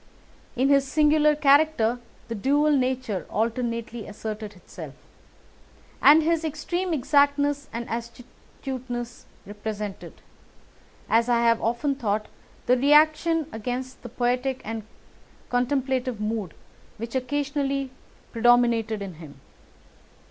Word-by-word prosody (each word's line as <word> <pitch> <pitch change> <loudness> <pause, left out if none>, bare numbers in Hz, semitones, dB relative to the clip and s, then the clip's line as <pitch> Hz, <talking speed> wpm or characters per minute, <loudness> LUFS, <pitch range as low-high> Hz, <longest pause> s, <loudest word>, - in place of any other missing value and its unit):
In 260 +3 +2
his 275 -1 +4
singular 300 0 +4
character 280 -5 +3 0.3
the 230 - -4
dual 285 +7 +2
nature 255 -7 -1
alternately 230 0 -2
asserted 215 0 -6
itself, 180 - -10 1.1
and 310 +2 +7
his 330 0 +1
extreme 345 +4 -2
exactness 285 0 +2
and 235 +1 -5
astuteness 240 +1 -7 0.2
represented, 210 -1 -6 0.9
as 230 +2 +2
I 235 -1 +3
have 230 -1 +3
often 240 +5 0
thought, 215 -5 -2 0.4
the 250 - +4
reaction 310 +3 +4
against 250 +4 -5
the 240 - -8
poetic 250 +2 -1
and 225 +1 -4 0.7
contemplative 255 -1 0
mood 210 -5 -3 0.4
which 230 +1 -6
occasionally 275 0 -1 0.4
predominated 230 -3 +3
in 190 -2 -7
him. 145 -4 -12
250 Hz, 105 wpm, -25 LUFS, 225-285 Hz, 1.1 s, and